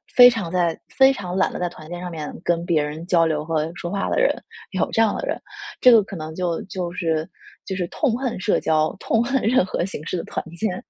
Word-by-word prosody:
非 245 -1 +10
常 205 -8 -3
在 175 -2 +1
非 265 0 +5
常 185 -7 -5
懒 190 - +2
得 - - -5
在 180 - 0
团 155 -2 -13
建 175 0 -5
上 180 - -5
面 155 -2 -6
跟 170 0 0
别 165 -3 +2
人 150 +3 -5
交 170 -2 +4
流 155 -2 0
和 160 -1 -1
说 175 0 -5
话 200 0 -1
的 - - +1
人， - - +4 0.4
有 - - 0
这 225 - +2
样 220 -2 +3
的 - - -3
人。 - - -2 0.4
这 250 - +8
个 230 -2 +8
可 195 - -9
能 155 -1 -6
就 175 -2 -1
就 180 -2 -4
是 165 -3 -1 0.4
就 190 - -4
是 180 -2 -1
痛 250 -6 0
恨 255 -6 -3
社 205 +2 +1
交， 155 0 +1
痛 225 - +1
恨 270 +1 0
任 245 +2 +4
何 180 - -2
形 170 -6 -6
式 - - -2
的 170 - -3
团 - - -4
建。 185 0 -2
180 Hz, 270 characters per minute, -22 LUFS, 165-215 Hz, 0.4 s, 非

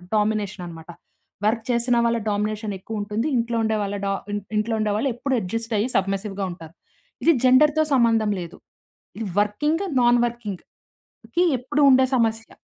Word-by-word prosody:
Domination 210 -3 0
అన్నమాట. 165 -1 -10 0.6
Work 225 +1 +1
చేసిన 240 0 +2
వాళ్ళ 235 0 +2
డామినేషన్ 210 +1 -2
ఎక్కువ 215 +2 -5
ఉంటుంది. 210 +6 -2
ఇంట్లో 235 0 -1
ఉండే 220 0 +1
వాళ్ళ 200 0 -3
డ - - 0 0.2
ఇ 205 - -1 0.2
ఇంట్లో 215 +2 0
ఉండే 215 -1 0
వాళ్ళు 235 +6 0
ఎప్పుడు 270 +3 -2
అడ్జస్ట్ 225 +5 -4
అయ్యి 215 +5 0
సబ్మర్సివ్‌గా 195 0 -1
ఉంటారు. 165 -2 -11 0.5
ఇది 335 - +6
జెండర్‌తో 300 +4 +5
సంబంధం 225 -4 +3
లేదు. 175 +1 -8 0.6
ఇది 225 - -4
వర్కింగ్, 295 - 0 0.2
నాన్ 240 0 +4
వర్కింగ్‌‌కి 230 -6 -7 0.8
ఎప్పుడు 290 +4 -1
ఉండే 260 0 +5
సమస్య. 225 -2 0
220 Hz, 150 wpm, -23 LUFS, 205-240 Hz, 0.8 s, ఇది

